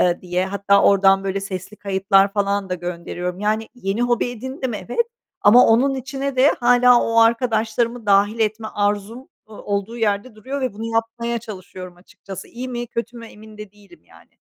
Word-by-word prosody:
eee, 175 Hz, -1 st, +2 dB
diye. 180 Hz, +1 st, -2 dB
Hatta 200 Hz, +1 st, +2 dB
oradan, 195 Hz, -1 st, +4 dB
böyle, 195 Hz, 0 st, -2 dB
sesli 195 Hz, +1 st, -7 dB
kayıtlar 195 Hz, -1 st, +2 dB
falan 200 Hz, -1 st, -1 dB
da 180 Hz, -, -1 dB
gönderiyorum. 175 Hz, +1 st, -5 dB
Yani 215 Hz, +1 st, -1 dB
yeni 210 Hz, -1 st, -2 dB
hobi 245 Hz, 0 st, +1 dB
edindim, 260 Hz, 0 st, -5 dB
evet 245 Hz, -, -2 dB, 0.3 s
,ama 240 Hz, +4 st, +7 dB
onun 260 Hz, +5 st, +3 dB
içine 270 Hz, +1 st, -4 dB
de 265 Hz, +3 st, +5 dB
hâlâ 245 Hz, 0 st, +5 dB
o 230 Hz, 0 st, 0 dB
arkadaşlarımı 230 Hz, 0 st, +1 dB
dâhil 205 Hz, +3 st, +3 dB
etme 220 Hz, 0 st, -1 dB
arzum, 205 Hz, +3 st, -2 dB, 0.3 s
ııı, 210 Hz, -, -11 dB
olduğu 205 Hz, +3 st, -3 dB
yerde 215 Hz, +1 st, -1 dB
duruyor 265 Hz, +6 st, -6 dB
ve 255 Hz, -4 st, -2 dB
bunu 220 Hz, +2 st, -7 dB
yapmaya 235 Hz, +1 st, -1 dB
çalışıyorum 185 Hz, -4 st, -10 dB
açıkçası. 190 Hz, +1 st, -11 dB
İyi 250 Hz, +2 st, -7 dB
mi 240 Hz, -1 st, -4 dB
kötü 235 Hz, +1 st, -5 dB
mü, 230 Hz, -, -10 dB
emin 215 Hz, -1 st, -14 dB
de 210 Hz, -1 st, -10 dB
değilim 200 Hz, -5 st, -20 dB
yani. 80 Hz, 0 st, -21 dB
215 Hz, 175 wpm, -21 LUFS, 195-240 Hz, 0.3 s, ama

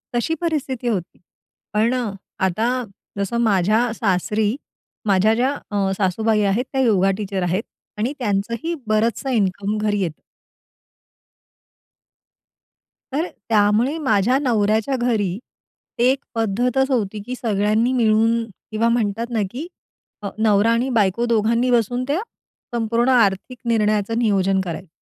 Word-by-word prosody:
तशी 240 Hz, +7 st, 0 dB
परिस्थिती 280 Hz, -7 st, -2 dB
होती. 190 Hz, -7 st, -3 dB, 0.5 s
पण 220 Hz, +3 st, +2 dB
अ, 240 Hz, -5 st, -1 dB, 0.3 s
आता 215 Hz, +6 st, 0 dB, 0.5 s
जसं 200 Hz, +4 st, -1 dB
माझ्या 210 Hz, +1 st, +3 dB
सासरी, 210 Hz, +2 st, 0 dB, 0.5 s
माझ्या 200 Hz, +3 st, +4 dB
ज्या 255 Hz, +4 st, +2 dB, 0.2 s
अ, 195 Hz, -2 st, 0 dB
सासूबाई 215 Hz, +3 st, +1 dB
आहेत 245 Hz, +6 st, 0 dB
त्या 265 Hz, -, +1 dB
योगा 195 Hz, -5 st, +3 dB
टीचर 195 Hz, -3 st, -3 dB
आहेत. 185 Hz, +5 st, 0 dB, 0.3 s
आणि 235 Hz, +7 st, -1 dB
त्यांचंही 230 Hz, +8 st, -1 dB
बरंचसं 225 Hz, +5 st, +1 dB
इन्कम 205 Hz, -2 st, 0 dB
घरी 210 Hz, -1 st, 0 dB
येतं. 165 Hz, -4 st, -4 dB, 2.9 s
तर 315 Hz, +6 st, -1 dB, 0.2 s
त्यामुळे 220 Hz, +7 st, +3 dB
माझ्या 255 Hz, -4 st, +2 dB
नवऱ्याच्या 220 Hz, 0 st, +1 dB
घरी 215 Hz, -7 st, 0 dB, 0.6 s
एक 255 Hz, +3 st, +3 dB, 0.2 s
पद्धतच 245 Hz, +5 st, +1 dB
होती, 215 Hz, -4 st, -1 dB
की 250 Hz, +2 st, -4 dB
सगळ्यांनी 215 Hz, +1 st, +1 dB
मिळून 225 Hz, 0 st, +3 dB, 0.3 s
किंवा 225 Hz, +2 st, +1 dB
म्हणतात 230 Hz, 0 st, 0 dB
ना 230 Hz, -3 st, 0 dB
की 290 Hz, +8 st, -6 dB, 0.5 s
अ, 200 Hz, -, -3 dB
नवरा 215 Hz, 0 st, +3 dB
आणि 240 Hz, +3 st, +1 dB
बायको 220 Hz, -1 st, +2 dB
दोघांनी 230 Hz, +2 st, +2 dB
बसून 245 Hz, +1 st, +1 dB
त्या, 310 Hz, +8 st, 0 dB, 0.5 s
संपूर्ण 235 Hz, +2 st, +1 dB
आर्थिक 235 Hz, 0 st, +2 dB
निर्णयाचं 215 Hz, -1 st, +1 dB
नियोजन 195 Hz, -4 st, +2 dB
करायचं. 185 Hz, 0 st, -6 dB
220 Hz, 120 wpm, -21 LUFS, 205-245 Hz, 2.9 s, माझ्या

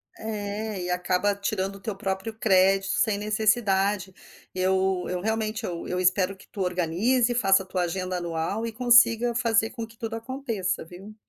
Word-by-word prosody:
É, 210 Hz, -1 st, -4 dB
e 180 Hz, -, -4 dB
acaba 180 Hz, +3 st, +1 dB
tirando 200 Hz, -1 st, -2 dB
o -, -, -15 dB
teu 205 Hz, +1 st, -5 dB
próprio 195 Hz, +1 st, -3 dB
crédito 195 Hz, -1 st, +3 dB
sem 215 Hz, -3 st, +2 dB
necessidade. 205 Hz, -2 st, +1 dB, 0.4 s
Eu 190 Hz, 0 st, +1 dB
eu 180 Hz, -1 st, -2 dB
realmente 220 Hz, +2 st, -2 dB
eu 170 Hz, -3 st, -5 dB
eu 180 Hz, -, -2 dB
espero 185 Hz, +1 st, +2 dB
que -, -, -18 dB
tu 200 Hz, -, -7 dB
organize, 185 Hz, +8 st, +1 dB
faça 195 Hz, -5 st, +3 dB
a -, -, -16 dB
tua 185 Hz, 0 st, -2 dB
agenda 185 Hz, +1 st, -2 dB
anual 170 Hz, +5 st, -2 dB
e -, -, -4 dB
consiga 240 Hz, 0 st, +4 dB
fazer 225 Hz, -1 st, +1 dB
com 230 Hz, -2 st, -6 dB
que 225 Hz, -, -19 dB
tudo 225 Hz, 0 st, -4 dB
aconteça 225 Hz, -8 st, -3 dB
viu? 190 Hz, +5 st, -12 dB
200 Hz, 170 wpm, -26 LUFS, 185-220 Hz, 0.4 s, consiga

